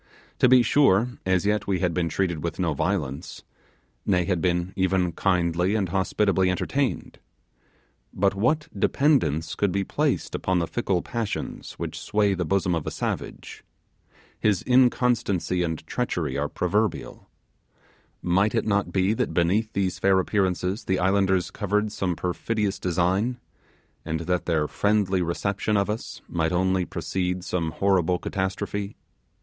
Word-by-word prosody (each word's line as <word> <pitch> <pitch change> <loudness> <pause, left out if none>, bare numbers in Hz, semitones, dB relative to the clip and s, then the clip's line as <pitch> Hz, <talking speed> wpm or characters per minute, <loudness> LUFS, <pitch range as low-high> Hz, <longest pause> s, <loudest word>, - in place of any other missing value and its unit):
To 130 - +5
be 125 -1 +7
sure, 120 -3 +4 0.2
as 95 0 +2
yet 105 0 0
we 95 -2 +1
had 90 -1 0
been 85 0 0
treated 85 -2 -1
with 85 -1 -3
no 85 -4 0
violence; 75 -2 -3 0.6
nay, 90 -3 +2
had 90 -3 0
been 90 +1 0
even 95 -1 +1
kindly 90 +2 +1
and 100 -5 0
hospitably 95 0 +1
entertained. 135 +8 -2 0.9
But 95 +1 +1
what 130 +10 +1
dependence 100 - +2
could 100 -2 0
be 100 +2 0
placed - - -1
upon 95 0 0
the 85 - +1
fickle 95 -3 -1
passions 115 -3 -4
which - - -5
sway 105 -1 +1
the 90 -2 -2
bosom 95 +1 +1
of 80 -3 -2
a - - +1
savage? - - -5 0.8
His 105 -4 +1
inconstancy 120 -8 +2
and 80 -2 -3
treachery - - -2
are - - -1
proverbial. 105 -4 -2 0.9
Might 95 +5 +2
it 115 - +1
not 100 -4 0
be 95 +3 +2
that - - -2
beneath 100 +6 +2
these 95 -2 -1
fair 95 0 +4
appearances 95 +1 0
the 95 - +1
islanders 95 0 +2
covered 105 +1 -1
some 90 -4 -2
perfidious 100 +4 -2
design, 95 +7 0 0.7
and 80 0 -3
that 90 +1 -1
their 80 -3 +1
friendly 100 -2 +1
reception 100 +4 -1
of 100 +1 +1
us 110 - -6
might 80 -1 -1
only 95 +1 +1
precede 90 +2 -3
some 85 -3 -1
horrible 90 0 +1
catastrophe? 100 +2 -3
95 Hz, 145 wpm, -25 LUFS, 90-105 Hz, 0.9 s, be